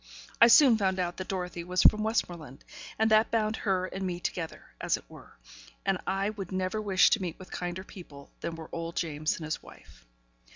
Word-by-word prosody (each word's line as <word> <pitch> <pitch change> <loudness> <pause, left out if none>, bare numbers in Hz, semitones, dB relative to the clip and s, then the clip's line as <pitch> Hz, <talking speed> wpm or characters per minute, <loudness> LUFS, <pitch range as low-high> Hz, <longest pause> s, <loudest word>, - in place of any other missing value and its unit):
I 235 - +10
soon 240 -2 +7
found 190 -2 +1
out 175 -1 -2
that 185 - -5
Dorothy 180 -2 -4
was 180 +1 +1
from 215 - +6
Westmoreland, 175 - -3 0.3
and 220 0 +2
that 215 +1 +5
bound 220 -1 0
her 185 -2 0
and 190 +1 -5
me 180 -2 -3
together, 165 -2 -5
as - - +1
it - - -16
were; - - -15 0.5
and 195 -2 +1
I 195 +2 0
would 200 -4 -7
never 185 +3 -1
wish 195 -3 +4
to 215 - +2
meet 175 -3 -4
with 185 - -13
kinder 180 +1 -4
people 150 -8 -13
than 165 - -4
were 160 -1 -9
old 165 0 -5
James 155 -2 -1
and 160 - -7
his 155 - -3
wife. - - -16
185 Hz, 205 wpm, -29 LUFS, 170-205 Hz, 0.5 s, I